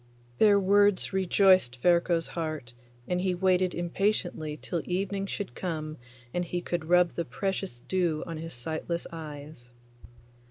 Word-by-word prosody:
Their 205 -2 +6
words 205 0 +3
rejoiced 185 -8 +4
Ferko's 170 +1 +2
heart, 155 -8 -4 0.3
and 180 0 0
he 185 -1 +1
waited 185 0 +2
impatiently 175 -3 -1
till 170 - -3
evening 195 +2 -2
should 205 0 -5
come 155 -3 -4 0.4
and 175 - 0
he 175 0 -3
could 175 -2 -3
rub 180 +1 +4
the 170 - -2
precious 190 -7 -3
dew 175 -3 0
on 165 -2 -5
his 165 -1 -6
sightless 160 +6 -3
eyes. 150 -5 -9
175 Hz, 135 wpm, -28 LUFS, 160-190 Hz, 0.4 s, Their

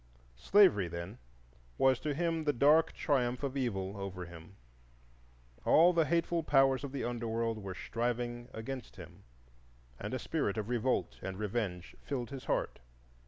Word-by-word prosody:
Slavery, 185 - +5
then, 85 +7 -7 0.6
was 130 -2 +4
to 150 -2 -2
him 165 0 0
the 145 - +2
dark 150 +6 +4
triumph 125 -3 0
of 140 -1 -2
Evil 100 -7 -2
over 95 -2 -5
him. 85 +2 -12 1.1
All 175 +3 +6
the 165 -2 +3
hateful 170 0 +1
powers 135 -3 +3
of 140 - -5
the 140 - -3
Under 120 -1 -3
world 115 0 -1
were 95 -2 -6
striving 120 +2 -3
against 125 +3 -7
him, - - -12 0.7
and 105 +5 -4
a - - 0
spirit 130 -5 -2
of 110 +1 -3
revolt 125 +1 0
and 95 -1 -5
revenge 100 -4 -3
filled 130 -3 -4
his 135 -2 -7
heart. - - -1
120 Hz, 155 wpm, -32 LUFS, 105-140 Hz, 1.1 s, All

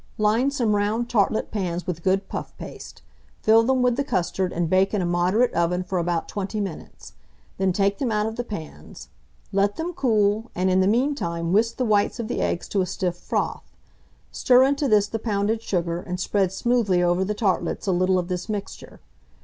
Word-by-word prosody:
Line 220 +5 +2
some 235 -7 0
round 215 +4 -1
tartlet 215 -1 +1
pans 180 -4 -3
with 170 -2 -4
good 190 +2 +1
puff - - -6
paste; - - -10 0.4
fill 220 +1 +6
them 255 +2 +1
with 250 -1 +2
the 280 - +1
custard, 180 -5 -1
and 170 0 -1
bake 190 +4 +2
in 200 - 0
a - - 0
moderate 180 +8 +2
oven 175 +2 0
for 180 0 -2
about 170 -1 -1
20 205 +1 -4
minutes; 195 -6 -7 0.5
then 190 -1 +2
take 200 +2 0
them 255 -4 -1
out 210 0 +1
of 220 0 -3
the 245 - -3
pans; 160 - -9 0.4
let 200 +1 +2
them 340 +2 -4
cool, 220 -4 +1
and 185 +1 +1
in 185 - +3
the 190 - +3
mean 250 +8 +2
time 170 -9 -3
whisk 230 +3 +2
the 255 - 0
whites 210 +2 +1
of 230 - -3
the 245 - -2
eggs 175 - -1
to 200 - +1
a - - +1
stiff 180 -1 -2
froth; 175 - -3 0.6
stir 250 -1 +4
into 280 +1 +1
this 210 -4 +4
the 225 +2 -4
pounded 215 0 -1
sugar, 175 -5 -2
and 180 0 -5
spread 190 0 +1
smoothly 200 -4 +1
over 175 +1 +2
the 210 +2 -2
tartlets 200 -2 -1
a 195 - +1
little 185 +1 +2
of 180 -1 -1
this 180 +3 -4
mixture. 205 -2 -6
200 Hz, 205 wpm, -24 LUFS, 180-225 Hz, 0.6 s, fill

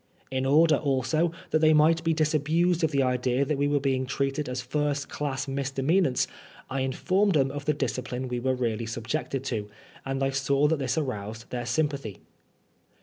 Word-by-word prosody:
In 130 0 -1
order, 155 +3 +5
also, 150 +4 +1 0.2
that 155 - +3
they 155 0 +5
might 160 +2 +4
be 165 - +2
disabused 160 +3 +1
of 160 - +3
the 140 -2 +1
idea 125 +1 +1
that 140 0 -1
we 145 - +2
were 145 0 +2
being 130 -2 0
treated 140 +1 -1
as 125 0 -3
first 145 +3 -1
class 135 -2 -3
mis 135 0 -2
demeanants, 135 +1 +2 0.5
I 135 - -1
informed 185 +9 +1
them 135 -2 +3
of 145 0 -6
the 150 - +2
discipline 130 -2 -3
we 125 -1 -2
were 130 +1 0
really 115 -2 -2
subjected 125 +4 -3
to;, 110 -6 -3 0.3
and 135 0 -2
I 135 - +1
saw 140 +2 +2
that 160 -1 +1
this 130 0 -1
aroused 110 -6 -4
their 120 -1 -3
sympathy. 140 - -1
135 Hz, 185 wpm, -27 LUFS, 130-150 Hz, 0.5 s, order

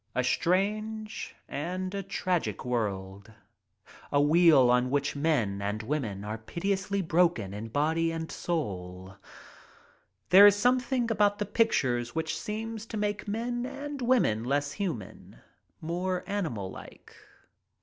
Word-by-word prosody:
A 125 - +1
strange 215 - -1
and 185 +5 -4
a 200 - -2
tragic 185 -6 -2
world 100 -4 -3 0.4
— - - -50 0.3
a 145 - +3
wheel 150 -4 +6
on 125 +1 +3
which 145 +2 0
men 135 -10 0
and 105 +2 -2
women 110 -7 -3
are 105 +2 -5
pitilessly 195 - -2
broken 170 - +1
in 105 +2 -6
body 160 +6 +1
and 165 0 -5
soul. 95 - -4 1.1
There 200 +3 +10
is 205 - +6
something 245 +2 +1
about 205 -1 +3
the 210 - -2
pictures 130 - +1
which 160 -1 -1
seems 220 +5 -5
to 220 - -5
make 210 0 -2
men 240 +3 -2
and 280 +1 -6
women 220 - +2
less 140 +3 0
human, 160 - -5 0.4
more 180 +3 -2
animal 125 - -3
like. - - -12
165 Hz, 130 wpm, -29 LUFS, -, 1.1 s, There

